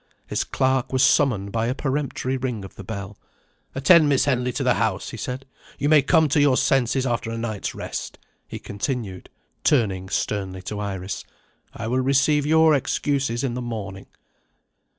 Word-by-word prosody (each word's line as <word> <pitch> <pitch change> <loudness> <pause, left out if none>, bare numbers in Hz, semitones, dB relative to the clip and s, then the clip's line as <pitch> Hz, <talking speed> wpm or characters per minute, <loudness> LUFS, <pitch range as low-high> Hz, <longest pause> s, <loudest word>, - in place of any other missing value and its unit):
His - - -1
clerk 130 -1 0
was 130 0 +2
summoned 100 -10 +3
by 115 +1 0
a 125 - -1
peremptory 135 -2 -2
ring 125 -6 -3
of - - -11
the 100 - -10
bell. 100 0 -7 0.6
"Attend 150 +3 +6
Miss 140 -2 +3
Henley 125 -2 +1
to - - -2
the - - +4
house," - - -1
he - - -7
said. 130 +2 -5 0.3
"You 145 +1 0
may 155 -2 +7
come 160 +3 +4
to 145 +1 +3
your 140 -3 +4
senses 130 0 +2
after 120 -2 -1
a 115 - -4
night's 110 -3 -4
rest," - - -5 0.3
he - - -6
continued, 105 -2 -4 0.3
turning 95 -9 +1
sternly 95 -3 -2
to 105 +3 -5
Iris. 95 -2 -4 0.5
"I 115 - -7
will 125 +3 0
receive 140 +2 +2
your 160 0 +5
excuses 135 -3 0
in 130 -3 -1
the 125 - -4
morning." 105 -5 -6
125 Hz, 170 wpm, -23 LUFS, 105-140 Hz, 0.6 s, may